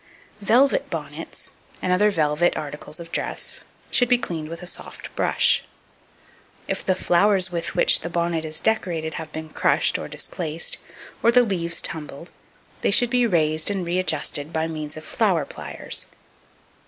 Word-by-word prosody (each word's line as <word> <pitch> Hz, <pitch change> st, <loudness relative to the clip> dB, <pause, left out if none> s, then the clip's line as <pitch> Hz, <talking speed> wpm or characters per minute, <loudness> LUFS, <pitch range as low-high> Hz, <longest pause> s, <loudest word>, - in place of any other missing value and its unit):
Velvet 245 Hz, +7 st, +3 dB
bonnets, -, -, -6 dB, 0.3 s
and 180 Hz, -, 0 dB
other 205 Hz, +3 st, +4 dB
velvet 155 Hz, -2 st, +1 dB
articles 150 Hz, +1 st, -6 dB
of 170 Hz, 0 st, -10 dB
dress, -, -, -3 dB, 0.3 s
should 245 Hz, -2 st, +3 dB
be 250 Hz, -, +5 dB
cleaned 160 Hz, -9 st, -4 dB
with 165 Hz, +2 st, -7 dB
a -, -, -6 dB
soft 180 Hz, -, -7 dB
brush. -, -, +3 dB, 1.0 s
If -, -, -2 dB
the 185 Hz, -, +1 dB
flowers 185 Hz, +1 st, +3 dB
with 170 Hz, -1 st, -3 dB
which -, -, +5 dB
the 170 Hz, -, -5 dB
bonnet 170 Hz, -1 st, -1 dB
is 155 Hz, -1 st, -1 dB
decorated 170 Hz, -8 st, 0 dB
have 160 Hz, -1 st, -9 dB
been 160 Hz, 0 st, -6 dB
crushed -, -, +2 dB
or -, -, -5 dB
displaced, 165 Hz, -1 st, -2 dB, 0.4 s
or 235 Hz, -, +5 dB
the 250 Hz, +1 st, +6 dB
leaves 170 Hz, -6 st, -1 dB
tumbled, 155 Hz, +1 st, -2 dB, 0.5 s
they -, -, +2 dB
should 240 Hz, +3 st, +4 dB
be 245 Hz, -1 st, +3 dB
raised 155 Hz, -4 st, +3 dB
and 195 Hz, -3 st, -2 dB
readjusted 165 Hz, -4 st, 0 dB
by 160 Hz, 0 st, -1 dB
means 155 Hz, -2 st, -4 dB
of 155 Hz, -, -9 dB
flower 185 Hz, -9 st, +1 dB
pliers. 75 Hz, -, -1 dB
170 Hz, 155 wpm, -23 LUFS, 155-195 Hz, 1.0 s, the